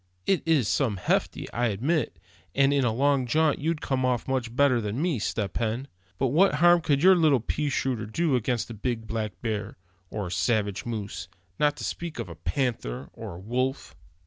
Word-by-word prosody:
It 190 - +2
is 150 -9 +3
some 115 -7 +1
hefty, 90 - 0
I 120 +1 +1
admit; 135 - 0 0.4
and 140 +1 +4
in 140 -1 +2
a 120 - +2
long 135 +2 +2
jaunt 155 +3 +2
you'd 160 +1 -1
come 130 -1 -1
off 125 -2 0
much 125 -3 -2
better 130 -3 +4
than 105 +3 -3
me, 160 -6 0
Step 105 -2 -2
Hen. 115 +4 -1 0.3
But 135 - +1
what 165 +5 +4
harm 175 +2 +5
could 145 -1 +1
your 190 +1 +8
little 155 -6 +4
pea 145 +6 -2
shooter 125 -5 -1
do 155 +5 +1
against 120 0 -1
a - - -5
big 115 +1 -3
black 110 -3 -4
bear, 110 -2 -3 0.3
or 105 -2 -4
a 90 - -6
savage 105 -1 0
moose, 100 -6 -4 0.3
not 150 -1 +2
to - - -6
speak 170 -2 -4
of - - -4
a 85 - -8
panther, 85 - -2
or - - -8
a - - -9
wolf?" 130 +7 -2
125 Hz, 200 wpm, -27 LUFS, 110-145 Hz, 0.4 s, your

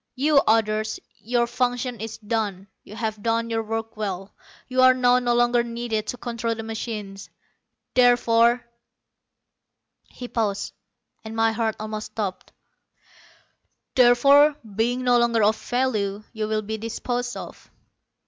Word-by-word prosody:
You 290 +3 +2
others, 215 -1 +1 0.2
your 235 +1 0
function 245 0 -2
is 225 0 -6
done. 210 -3 -3 0.2
You 210 - -12
have 220 -2 -3
done 230 +1 0
your 225 0 0
work 225 0 -4
well, 195 -2 -5 0.3
you 255 0 +1
are 255 0 +7
now 250 0 +4
no 240 -1 +1
longer 240 0 +3
needed 235 -2 -3
to 250 - -4
control 230 -1 -3
the 225 - -6
machines. 215 -3 -6 0.6
Therefore," 245 -1 +4 1.4
he 250 - -8
paused, 205 -4 -2 0.5
and 220 0 -7
my 225 0 +3
heart 220 -1 -1
almost 215 0 -6
stopped 195 -4 -4 1.4
"therefore, 275 +4 +6 0.2
being 240 +4 0
no 245 -1 +4
longer 235 -2 +2
of 215 +2 +4
value, 215 -6 -1
you 215 -1 -3
will 215 0 -1
be 220 +1 -4
disposed 245 +2 -3
of." - - -10
230 Hz, 135 wpm, -24 LUFS, 215-245 Hz, 1.4 s, are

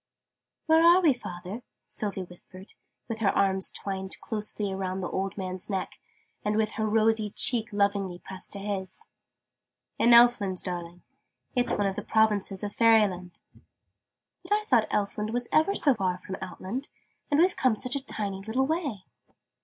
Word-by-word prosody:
"Where 320 0 +5
are 345 +2 +7
we, 325 -6 +4
father?" 185 -1 -8 0.2
Sylvie 200 -3 -4
whispered, 185 +2 -12 0.3
with 230 -1 -5
her 210 -3 +2
arms 190 -1 +3
twined 190 -1 -3
closely 210 -2 -3
around 190 0 -3
the 180 - -2
old 195 +1 -3
man's 185 0 -4
neck, 190 -2 -4 0.4
and 210 +1 0
with 220 -1 +1
her 220 -1 -2
rosy 220 0 +2
cheek 225 +2 +2
lovingly 200 -3 0
pressed 190 +1 -8
to 200 - -6
his. 195 -2 -3 0.9
"In 235 - +4
Elfland, 235 -6 +5
darling. 175 -1 -6 0.5
It's 245 -1 +1
one 205 - 0
of 195 -1 -1
the - - -3
provinces 210 -3 +1
of 205 0 -4
Fairyland." 205 -6 +2 1.0
"But - - -2
I 425 0 +1
thought 240 - +3
Elfland 210 +1 -1
was 245 0 0
ever 320 +6 +3
so 280 - +4
far 185 -5 -1
from 190 +1 -7
Outland: 190 +8 -5 0.4
and 290 - +2
we've 360 +2 +4
come 255 -4 +2
such 250 +4 -2
a 280 - -2
tiny 200 -6 -4
little 225 +6 0
way!" 285 - -3
210 Hz, 160 wpm, -27 LUFS, 190-235 Hz, 1.0 s, are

